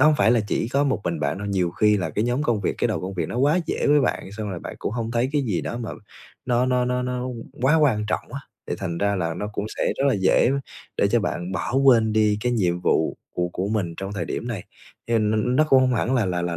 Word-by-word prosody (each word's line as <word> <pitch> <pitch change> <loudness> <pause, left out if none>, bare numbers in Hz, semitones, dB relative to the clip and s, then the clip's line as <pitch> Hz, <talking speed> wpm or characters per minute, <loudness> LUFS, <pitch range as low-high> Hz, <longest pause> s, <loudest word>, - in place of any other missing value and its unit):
Đó 150 - +7
không 155 - +5
phải 110 -1 +4
là 120 - +4
chỉ 110 - 0
có 140 +3 +1
một 135 -6 0
mình 85 -2 -2
bạn 70 +6 -1
đâu, 105 - -5
nhiều 95 -4 0
khi 105 +4 +3
là 90 -5 -2
cái 105 +8 -1
nhóm 125 +4 0
công 120 -7 +1
việc, 95 - -1
cái - - +1
đầu - - -1
công 95 +1 -5
việc 85 -4 -2
nó - - -5
quá 145 +6 +3
dễ - - -1
với 145 0 +5
bạn 110 -6 -2
xong 105 0 -5
rồi 90 - -4
bạn - - -7
cũng - - -3
hông 115 -1 -3
thấy 120 +2 +1
cái 145 -2 +1
gì 105 -9 -1
đó 120 - -4
mà 115 -2 -5 0.5
nó 125 0 +2
nó 125 -1 +2
nó 125 0 0
nó 125 0 -2 0.4
quá 140 +4 +4
quan 120 -9 +2
trọng - - -3
á, - - -5 0.3
thì - - -2
thành 85 0 -3
ra 100 0 +1
là 85 -3 -1
nó 105 +4 -4
cũng 105 - -3
sẽ - - 0
rất 135 - +1
là 135 - +3
dễ 95 +4 +3 0.5
để 100 - +3
cho 120 +3 +2
bạn 90 -3 -3
bỏ 110 - -3
quên 115 -5 +5
đi 105 -1 +2
cái 125 +2 0
nhiệm 90 -6 +1
vụ 80 -2 +1 0.2
của 90 0 0
của 95 +3 -3
mình 100 -6 -1
trong 95 +1 -5
cái - - -7
thời - - -2
điểm 120 - -4
này, 105 -6 -4 0.4
hiền 110 -2 +2
n 110 +4 +1
nó 155 - +5
cũng 135 -1 +6
hông 130 -1 +2
hẳn 120 +3 0
là 120 -6 +2
là 90 -1 -1
là 85 -1 -2
110 Hz, 290 wpm, -23 LUFS, 95-125 Hz, 0.5 s, Đó